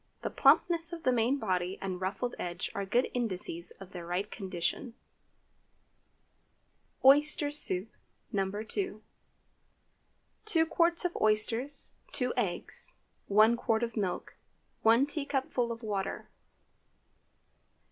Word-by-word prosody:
The - - -2
plumpness 330 +4 +3
of 330 - -7
the 255 - +3
main 245 +3 +2
body 185 -5 -1
and 185 -1 -4
ruffled 220 +6 -2
edge 175 0 -4
are 200 -1 -4
good 245 +6 +1
indices 185 -7 -3
of 195 -1 -11
their 175 -2 -7
right 180 +4 -3
condition. 190 +4 -3 2.1
OYSTER 290 +1 +5
SOUP 190 -10 +5 0.5
(No. 195 -1 0
2). 225 - -3 1.4
2 330 -7 +3
qts. 335 +1 +1
of 350 - -1
oysters. 225 +6 +2 0.2
2 - - 0
eggs. - - -2 0.3
1 215 +3 +5
qt. 235 -1 0
of 230 -2 -3
milk. 195 -5 -3 0.5
1 230 +4 +5
teacupful 275 -5 -1
of 230 +1 -7
water. 200 -3 -3
230 Hz, 115 wpm, -30 LUFS, 195-280 Hz, 2.1 s, OYSTER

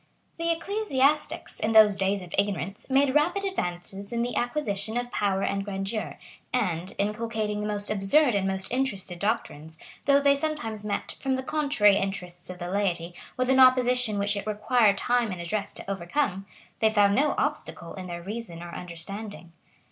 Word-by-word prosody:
] - - -41
The 335 0 0
ecclesiastics, 330 -5 0
in 220 +1 0
those 215 -2 +7
days 195 0 0
of 175 - -11
ignorance, 195 - -2
made 270 0 +3
rapid 345 +7 +2
advances 195 - -4
in 235 0 0
the 245 - -3
acquisition 225 -4 -1
of 245 0 -3
power 195 -1 0
and 195 0 -1
grandeur; 200 +2 -3 0.3
and, 185 -7 -1
inculcating 215 0 -2
the 210 - -2
most 205 0 -2
absurd 225 +7 +3
and 195 -1 +1
most 190 0 -2
interested 210 -9 -2
doctrines, 160 -7 -3 0.3
though 280 0 +5
they 280 0 +5
sometimes 280 -8 -3
met, 205 -1 -3
from 265 -1 0
the 260 - -3
contrary 260 -9 +3
interests 180 -3 -4
of 180 - -7
the 175 0 -5
laity, 180 -4 -1 0.2
with 255 0 +1
an 265 - +4
opposition 250 -3 +5
which 200 +1 +1
it 200 - -4
required 215 0 +3
time 240 -2 +1
and 180 - -5
address 200 +4 -2
to - - -7
overcome, 195 +2 -2 0.3
they 220 - +4
found 205 -2 +4
no 285 +6 +2
obstacle 295 - -2
in 185 -2 -7
their 170 -1 -6
reason 195 -4 -6
or 170 0 -9
understanding. 180 +2 -7
210 Hz, 175 wpm, -27 LUFS, 195-255 Hz, 0.3 s, those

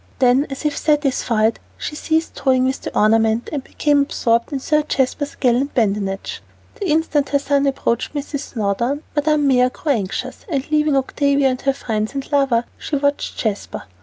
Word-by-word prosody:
Then, 260 +2 +3
as 270 +2 -6
if 295 -1 +1
satisfied, 255 -7 +1 0.2
she 300 - -5
ceased 320 +1 -1
toying 260 -2 +2
with 260 +1 -1
the - - -5
ornament 225 +2 +3
and 280 -3 -2
became 290 0 +1
absorbed 235 -3 0
in 275 - -2
Sir 300 +3 +2
Jasper's 285 0 -1
gallant 255 +3 +1
badinage. 200 -4 -1 0.3
The 410 -7 -4
instant 305 -2 +1
her 280 - +3
son 280 0 +1
approached 265 0 -1
Mrs. 285 0 -3
Snowdon, 235 +6 -1
Madame 295 -1 +2
Mère 250 -1 +4
grew 300 - -2
anxious, 205 -7 -3
and 280 -2 -2
leaving 300 -1 +3
Octavia 275 0 +2
to 255 - -14
her 275 - +3
friends 220 -3 -3
and 275 +1 -5
lover, 270 -5 +3 0.2
she 300 - -3
watched 285 0 -1
Jasper. 210 -3 -3
275 Hz, 170 wpm, -20 LUFS, 235-290 Hz, 0.3 s, Mère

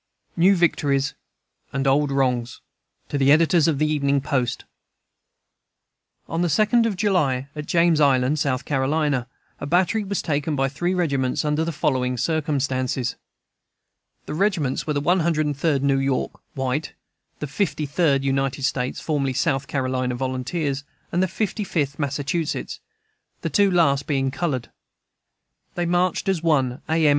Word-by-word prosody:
NEW 185 +4 +5
VICTORIES 145 -5 +1 0.6
AND 135 0 -2
OLD 140 +1 +2
WRONGS 125 -3 0 0.5
To 145 - -1
the 135 +1 +4
Editors 165 +1 +4
of 155 -4 +1
the 155 - +2
Evening 140 -2 +1
Post: 130 -2 -2 1.6
On 165 - -2
the 175 - +2
2d 220 +6 +3
of 210 - -2
July, 150 -10 +1
at 150 0 -6
James 170 -2 +3
Island, 140 +1 +3
S. 135 -1 -1
C., - - -5
a 135 -2 -2
battery 185 +7 +2
was 200 0 -3
taken 150 -1 -1
by 135 0 +1
three 175 +7 -1
regiments, 140 -6 0
under 150 +1 +1
the 165 - -2
following 130 -4 0
circumstances: 135 -4 -1 1.1
The - - -5
regiments 160 -8 0
were 150 - 0
the 145 - -1
One 180 +6 +2
Hundred 160 -2 +1
and 145 -1 -1
Third 140 -1 0
New 135 -1 +2
York 135 -1 0 0.2
(white), 135 +3 -2 0.4
the - - -4
Thirty 150 0 -1
Third 145 -2 +1
United 135 0 -1
States 130 -2 -1
(formerly 140 -4 -1
First - - +1
South 140 -5 0
Carolina 130 -2 -1
Volunteers), 135 +3 -2 0.3
and 175 - +1
the 185 - +2
Fifty 210 +3 -2
Fifth 145 -7 -2
Massachusetts, 145 +3 -2 0.6
the - - -3
two 205 -2 +4
last 155 -6 +2
being 135 -2 0
colored. 140 -5 -2 1.0
They 175 - -1
marched 175 +2 +1
at 190 -1 +2
one 135 -6 +1
A. 160 0 +2
M. - - +6
145 Hz, 155 wpm, -23 LUFS, 135-165 Hz, 1.6 s, M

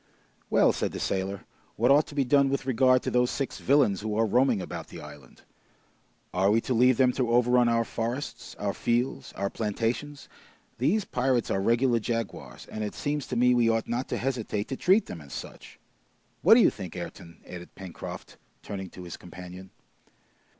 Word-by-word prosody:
"Well," - - +4
said - - -2
the - - -5
sailor, 95 0 -2 0.3
"what 120 +4 +3
ought 145 +2 +5
to 145 - -11
be 140 - +2
done 140 +1 +3
with 135 -1 -2
regard 130 0 +3
to - - -2
those 125 0 +2
six 135 - -3
villains 130 -9 +3
who 105 0 -3
are 115 - +3
roaming 125 +1 +3
about 90 - -6
the - - -10
island? 75 -4 -13 0.9
Are 95 +2 +2
we 110 +2 +4
to 130 - -2
leave 125 +1 +4
them 130 -1 +4
to 125 -1 -1
overrun 125 0 +4
our 115 0 +2
forests, 120 +6 -4
our 100 -1 -2
fields, 120 +2 -1
our 100 0 -3
plantations? 115 +7 -3 0.5
These 185 - +1
pirates 125 -1 0
are 95 - +1
regular 120 +3 +2
jaguars, 105 - -4
and 110 - -5
it 105 - -4
seems 145 -1 -2
to - - -4
me 125 +1 +4
we 120 -2 +3
ought 115 -1 0
not 120 +2 -2
to - - -1
hesitate 115 -5 -2
to 135 - -2
treat 190 +9 +3
them 85 - -8
as 70 -2 -12
such! - - -9 0.6
What - - +7
do - - +6
you - - +5
think, - - -8
Ayrton?" 85 -1 -8
added 90 -1 -10
Pencroft, 95 -3 -9 0.3
turning 95 -2 -6
to 90 - -11
his 85 - -8
companion. 90 +1 -10
115 Hz, 190 wpm, -27 LUFS, 100-130 Hz, 0.9 s, What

